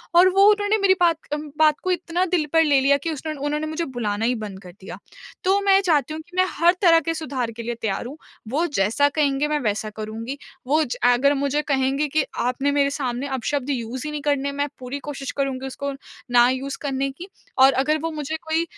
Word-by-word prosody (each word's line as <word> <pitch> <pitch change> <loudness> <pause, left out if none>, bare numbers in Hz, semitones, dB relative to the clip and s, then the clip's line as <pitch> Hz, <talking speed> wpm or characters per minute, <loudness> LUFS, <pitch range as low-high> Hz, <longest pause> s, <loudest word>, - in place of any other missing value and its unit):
और 360 +2 +7
वो 385 +1 +2
उन्होंने 415 0 +2
मेरी 395 -2 +4
बात 335 -2 +4
क - - -7
अम, 300 0 -4
बात 305 -1 +4
को 370 - 0
इतना 350 0 -1
दिल 350 -4 0
पर 325 0 +5
ले 290 -3 +4
लिया 280 +1 +4
कि 320 +4 -4
उसने 310 +1 -4
उन्होंने 300 +2 -2
मुझे 315 +2 -3
बुलाना 225 -5 -2
ही 250 +1 +1
बंद 210 -4 -7
कर 180 - -11
दिया। 190 - -8 0.5
तो 385 +2 +3
मैं 390 -1 +5
चाहती 310 -6 +1
हूँ 315 - -5
कि 345 +3 -17
मैं 370 - +5
हर 345 +1 +3
तरह 335 -4 +6
के 330 0 -2
सुधार 260 -7 -3
के 230 +1 -8
लिए 240 +1 -3
तैयार 215 0 -2
हूँ। 275 +5 -8 0.3
वो 300 +8 +1
जैसा 230 +7 +2
कहेंगे 285 -1 +1
मैं 300 0 0
वैसा 215 -3 -2
करूँगी। 220 +5 -6 0.3
वो 305 +4 +3
ज 255 - -4
अगर 245 +3 +4
मुझे 280 +1 0
कहेंगे 275 0 0
कि, 305 +1 +1 0.2
"आपने 260 +4 0
मेरे 280 -1 +2
सामने 265 -2 -3
अपशब्द 270 +1 -2
यूज़ 250 0 -3
ही 300 - -3
नहीं 300 -1 -4
करने।" 280 -1 0
मैं 285 +1 -1
पूरी 255 +2 -5
कोशिश 275 -2 -6
करूँगी 270 -1 -2
उसको 280 +1 -4 0.4
ना 240 0 +6
यूज़ 270 +2 -3
करने 275 -1 -1
की 340 +7 -10 0.3
और 265 +1 +7
अगर 275 +4 +1
वो 330 - -1
मुझे 305 0 -4
कोई 320 +1 +1
285 Hz, 225 wpm, -23 LUFS, 255-315 Hz, 0.5 s, और